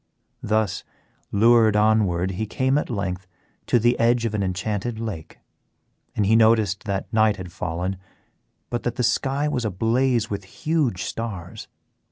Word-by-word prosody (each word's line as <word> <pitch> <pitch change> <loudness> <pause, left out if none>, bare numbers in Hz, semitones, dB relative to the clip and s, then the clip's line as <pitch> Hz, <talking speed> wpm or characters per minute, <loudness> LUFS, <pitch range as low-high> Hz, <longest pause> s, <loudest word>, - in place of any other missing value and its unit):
Thus 110 -2 0 0.5
lured 110 0 +5
onward 105 -4 +2
he 105 +4 -3
came 130 +6 +1
at - - -5
length 95 -4 -3 0.4
to - - +4
the 120 +1 +2
edge 120 0 +3
of 110 - -2
an 105 - -1
enchanted 100 +4 -2
lake, 105 -9 -6 0.8
and 105 - +1
he 110 +3 +4
noticed 110 -3 +3
that 100 +1 -3
night 110 -1 +4
had 90 -3 -8
fallen 90 +3 -3 0.7
but 120 -1 -1
that 120 - -3
the 125 - -1
sky 135 +4 +1
was 135 -5 -1
ablaze 115 +4 +1
with 100 -2 -5 0.2
huge 150 - +1
stars. 105 -7 -6
110 Hz, 150 wpm, -23 LUFS, 95-120 Hz, 0.8 s, lured